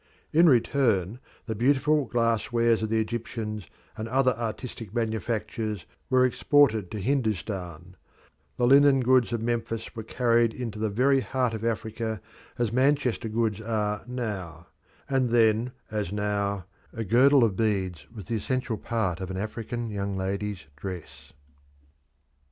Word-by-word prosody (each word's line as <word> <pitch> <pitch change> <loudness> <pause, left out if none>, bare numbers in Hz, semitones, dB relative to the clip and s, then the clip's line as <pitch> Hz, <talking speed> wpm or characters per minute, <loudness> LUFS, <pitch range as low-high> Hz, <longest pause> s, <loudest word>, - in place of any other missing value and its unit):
In 165 +2 +6
return, 120 - +2 0.3
the 110 - -2
beautiful 140 +5 +2
glass 115 -1 0
wares 115 -1 +3
of 110 - -2
the 110 0 +2
Egyptians 110 -2 -4 0.3
and 110 - -5
other 130 +1 +3
artistic 115 -1 -6
manufactures 110 -2 -2 0.2
were 130 -1 +5
exported 125 -6 +3
to 105 - -5
Hindustan; 95 - -2 0.6
the 125 - +2
linen 140 +1 +6
goods 125 -1 +3
of 115 -1 -2
Memphis 115 0 -3
were 110 - -4
carried 115 0 +2
into 115 -4 -5
the 110 0 0
very 135 +6 +3
heart 130 -2 -1
of 110 0 -5
Africa 110 -1 -2 0.4
as 120 -2 0
Manchester 130 -3 +1
goods 110 -1 0
are 105 -2 -1
now; 95 -9 -5 0.4
and 130 -2 +1
then, 115 +1 +3 0.2
as 105 -4 -2
now, 100 -2 -1 0.3
a 115 - -4
girdle 125 +6 +5
of 105 -4 +2
beads 95 -8 -1
was 105 - -9
the 115 +5 -1
essential 125 +1 -2
part 105 -8 -2
of 95 - -4
an 95 - -4
African 115 +3 -4
young 100 -1 -3
lady's 100 0 -3
dress. 90 0 -8
115 Hz, 140 wpm, -27 LUFS, 105-125 Hz, 0.6 s, In